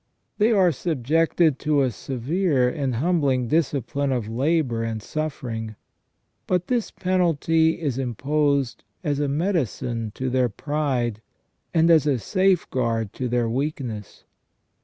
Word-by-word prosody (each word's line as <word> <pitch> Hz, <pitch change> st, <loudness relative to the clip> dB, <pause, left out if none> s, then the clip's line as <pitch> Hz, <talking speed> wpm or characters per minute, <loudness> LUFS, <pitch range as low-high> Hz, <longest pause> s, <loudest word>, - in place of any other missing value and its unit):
They 215 Hz, +3 st, +4 dB
are 190 Hz, -5 st, +4 dB
subjected 160 Hz, +1 st, +1 dB
to 150 Hz, -2 st, +2 dB
a 130 Hz, -, +1 dB
severe 135 Hz, -, 0 dB
and 135 Hz, -2 st, -1 dB
humbling 140 Hz, -4 st, +1 dB
discipline 145 Hz, -3 st, 0 dB
of 120 Hz, -5 st, -1 dB
labour 130 Hz, 0 st, 0 dB
and 115 Hz, -1 st, -3 dB
suffering; 115 Hz, -5 st, -4 dB, 0.7 s
but 180 Hz, -1 st, +1 dB
this 240 Hz, +1 st, 0 dB
penalty 165 Hz, -3 st, +1 dB
is 140 Hz, -6 st, -2 dB
imposed 140 Hz, +1 st, 0 dB, 0.2 s
as 145 Hz, -3 st, 0 dB
a 145 Hz, -, +1 dB
medicine 140 Hz, -, -1 dB
to 130 Hz, -1 st, -2 dB
their 125 Hz, -1 st, +2 dB
pride, 125 Hz, -4 st, -2 dB, 0.5 s
and 165 Hz, 0 st, +4 dB
as 155 Hz, -3 st, +5 dB
a 140 Hz, -3 st, +2 dB
safeguard 120 Hz, -, 0 dB
to 130 Hz, -, -3 dB
their 120 Hz, -1 st, +1 dB
weakness. 125 Hz, -4 st, -4 dB
140 Hz, 125 wpm, -24 LUFS, 120-160 Hz, 0.7 s, as